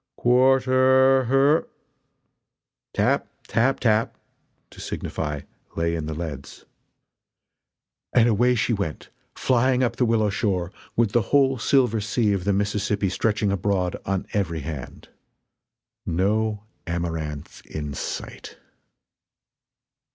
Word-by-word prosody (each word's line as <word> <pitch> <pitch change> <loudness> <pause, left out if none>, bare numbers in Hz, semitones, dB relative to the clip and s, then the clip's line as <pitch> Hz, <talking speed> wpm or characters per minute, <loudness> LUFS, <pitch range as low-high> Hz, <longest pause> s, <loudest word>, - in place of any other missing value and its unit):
"Quarter 130 +1 +4
her 135 +5 +3 0.6
" - - -59
"Tap! - - +1 0.2
tap! 120 +5 +1
tap!" 110 -2 +1 0.5
(to - - -12
signify 75 -2 -4 0.3
"Lay 85 0 0
in 80 -2 -3
the 80 - -4
leads") 75 -5 -7 1.5
And 120 -1 +4
away 120 +3 +3
she 115 0 +1
went, 100 -8 -4 0.3
flying 130 0 +2
up 120 - -1
the 125 - +2
willow 110 -3 +2
shore, 95 -4 -1 0.2
with 115 -3 +2
the 120 - +3
whole 135 -3 +3
silver 120 -3 +2
sea 105 0 +1
of 95 -2 -2
the 100 - +2
Mississippi 100 0 0
stretching 105 +1 0
abroad 95 -2 0
on 95 -1 -2
every 85 -6 -1
hand. 70 -4 -8 1.0
No 105 +4 0 0.2
Amaranth 80 -3 -4
in 75 -2 -5
sight! - - -6
105 Hz, 115 wpm, -24 LUFS, 85-125 Hz, 1.5 s, Quarter